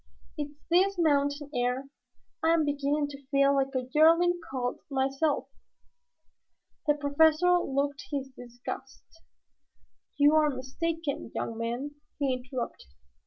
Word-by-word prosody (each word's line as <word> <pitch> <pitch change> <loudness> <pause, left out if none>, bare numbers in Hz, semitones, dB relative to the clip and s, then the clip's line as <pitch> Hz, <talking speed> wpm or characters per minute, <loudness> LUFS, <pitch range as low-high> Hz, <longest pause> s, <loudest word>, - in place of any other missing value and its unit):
It's 295 -1 -5 0.2
this 385 +3 +4
mountain 285 -2 +1
air. 250 +1 0 0.6
I 325 +1 +4
am 320 -2 +2
beginning 290 +1 0
to 280 0 -10
feel 275 0 +3
like 270 0 0
a 255 -1 -1
yearling 335 +3 +5
colt 250 -2 -2
myself." 275 +2 0 1.4
The 295 - +4
Professor 315 +5 +4
looked 280 -2 -2
his 275 -2 -3
disgust. 245 +2 -8 1.1
"You 290 +1 +5
are 310 -1 +4
mistaken, 285 +2 -3
young 230 - -3
man," 240 +6 -4 0.2
he 275 -3 +1
interrupted. 255 - -5
285 Hz, 120 wpm, -29 LUFS, 265-310 Hz, 1.4 s, yearling